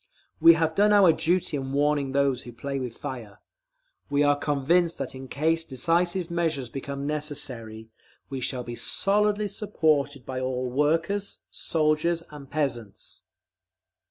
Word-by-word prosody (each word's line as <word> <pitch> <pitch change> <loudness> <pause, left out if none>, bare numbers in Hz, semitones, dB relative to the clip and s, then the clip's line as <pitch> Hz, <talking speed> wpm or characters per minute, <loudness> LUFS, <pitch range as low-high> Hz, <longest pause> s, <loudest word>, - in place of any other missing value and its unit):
We 165 - +9
have 160 -1 0
done 205 +4 +4
our 195 -5 +7
duty 170 -2 0
in 135 0 -5
warning 145 -1 +1
those 135 -2 +1
who 120 - -10
play 135 +4 -4
with 125 -3 -5
fire. 120 -8 -7 0.7
We 145 +1 +2
are 145 0 +4
convinced 150 +4 +1
that - - -4
in 130 0 -8
case 160 +5 0
decisive 170 +5 0
measures 160 -7 -1
become 140 +2 -5
necessary, 130 -7 -5 0.4
we 135 -1 -5
shall 125 0 -2
be 120 0 -6
solidly 210 - +2
supported 145 - 0
by 130 -1 -4
all 130 -1 -2
workers, 165 +9 0
soldiers, 160 +1 0
and 145 -2 -11
peasants. 120 -9 -4
145 Hz, 140 wpm, -26 LUFS, 130-165 Hz, 0.7 s, We